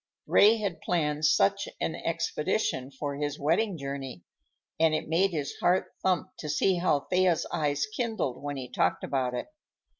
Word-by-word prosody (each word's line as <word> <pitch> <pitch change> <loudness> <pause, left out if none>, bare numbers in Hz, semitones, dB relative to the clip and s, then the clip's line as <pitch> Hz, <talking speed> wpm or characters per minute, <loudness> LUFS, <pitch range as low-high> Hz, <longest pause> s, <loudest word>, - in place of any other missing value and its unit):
Ray 215 +3 +6
had 200 -6 -3
planned 150 -3 0
such 125 -10 +3
an - - -1
expedition 130 0 -1
for 140 +1 -5
his 145 0 -2
wedding 175 +6 +1
journey, 135 - -6 0.6
and 160 -1 +4
it - - -3
made 175 +5 +3
his 150 -6 -3
heart 180 +2 +2
thump 185 0 +1
to 150 - -5
see 180 +5 +2
how 170 -5 +2
Thea's 180 0 +2
eyes 145 -2 0
kindled 220 - -3
when 145 0 -4
he 130 -2 -5
talked - - 0
about 130 -2 -1
it. 125 - -4
150 Hz, 160 wpm, -28 LUFS, 140-185 Hz, 0.6 s, Ray